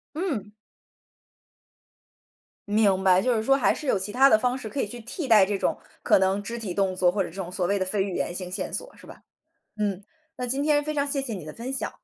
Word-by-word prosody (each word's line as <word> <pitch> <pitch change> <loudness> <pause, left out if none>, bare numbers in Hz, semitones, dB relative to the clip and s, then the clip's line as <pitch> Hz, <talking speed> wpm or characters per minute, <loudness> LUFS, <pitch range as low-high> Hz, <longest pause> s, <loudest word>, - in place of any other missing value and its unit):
嗯。 285 - -3 2.2
明 205 -2 +3
白， 185 -1 +5
就 250 0 +2
是 220 - 0
说 270 +4 +4
还 - - +3
是 300 - -8
有 200 - +2
其 205 +2 -5
它 270 +2 +6
的 220 - +5
方 250 +2 0
式 250 -4 -7
可 280 - -7
以 240 - +1
去 240 +3 -9
替 260 +7 -5
代 215 -6 +6
这 205 0 -1
种， - - -1 0.2
可 - - +5
能 190 +1 +1
肢 230 +4 -5
体 195 -6 -5
动 195 -2 +1
作 180 -1 +3
或 195 +1 0
者 - - -7
这 165 - -16
种 190 -3 -5
所 180 -1 -1
谓 200 +2 +1
的 185 - 0
非 195 0 0
语 195 -2 -4
言 175 - -2
性 180 -1 -6
线 - - -3
索， - - -6
是 - - -16
吧？ - - -13 0.6
嗯， 205 -2 -2 0.3
那 250 - -3
今 270 +3 -1
天 295 -1 +2
非 305 - -2
常 285 -1 0
谢 280 -1 -1
谢 240 -4 -4
你 175 -6 -6
的 155 - -7
分 245 +3 -6
享。 - - -2
210 Hz, 270 characters per minute, -26 LUFS, 190-265 Hz, 2.2 s, 它